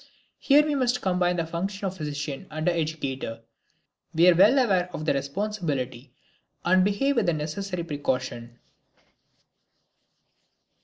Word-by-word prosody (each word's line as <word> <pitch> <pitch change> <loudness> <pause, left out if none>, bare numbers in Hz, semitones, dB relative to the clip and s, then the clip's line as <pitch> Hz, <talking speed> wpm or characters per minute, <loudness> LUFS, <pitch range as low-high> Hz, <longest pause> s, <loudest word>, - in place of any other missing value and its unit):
Here 295 +2 +5
we 300 - 0
must 250 -3 +1
combine 180 -1 +1
the 170 -2 -1
function 195 +5 -4
of 190 -1 -3
physician 150 -4 -5
and 155 +1 -4
educator; 150 -9 -2 0.7
we 170 +2 +5
are - - +7
well 205 +10 +5
aware 190 -8 +2
of 155 - -5
the - - +2
responsibility 140 - -3 0.5
and 185 +1 +4
behave 245 +8 +1
with 215 -6 +2
the 170 - +3
necessary 170 +4 -4
precaution. 130 -6 -3
170 Hz, 125 wpm, -26 LUFS, 145-200 Hz, 0.7 s, are